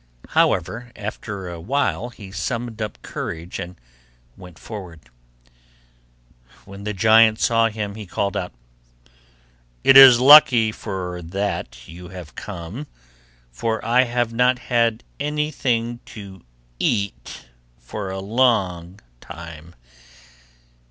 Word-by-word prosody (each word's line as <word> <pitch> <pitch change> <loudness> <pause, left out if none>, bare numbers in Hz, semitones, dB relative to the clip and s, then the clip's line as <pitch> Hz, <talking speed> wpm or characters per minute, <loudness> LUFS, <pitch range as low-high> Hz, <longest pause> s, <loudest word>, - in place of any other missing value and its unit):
However, 120 +2 0
after 100 -2 -6
a 85 -1 -7
while 125 +2 -1
he 100 -5 -12
summoned 115 +2 -4
up 105 -2 -5
courage 85 +3 -6
and 90 -2 -8 0.6
went 90 -3 -14
forward. 95 -7 -9 1.7
When 100 +1 -11
the 105 - -2
giant 110 +2 +5
saw 115 -1 +3
him, 105 -2 -5
he 105 -1 -9
called 100 +3 -2
out, 90 -3 -3 1.3
'It 135 - +6
is 135 -3 +10
lucky 125 -5 +7
for 90 -5 -6
that 85 -9 -4
you 90 +2 -11
have 90 -6 -10
come, 90 - -8 0.6
for 110 - -3
I 125 +2 +4
have 120 -1 -1
not 125 +2 +3 0.2
had 115 -1 +2 0.2
anything 135 -6 -1
to 100 -4 -11 0.4
eat 100 -1 -2 0.3
for 95 - -7
a 95 - -5
long 95 -5 0 0.2
time. 85 +1 -11
105 Hz, 110 wpm, -21 LUFS, 90-120 Hz, 1.7 s, is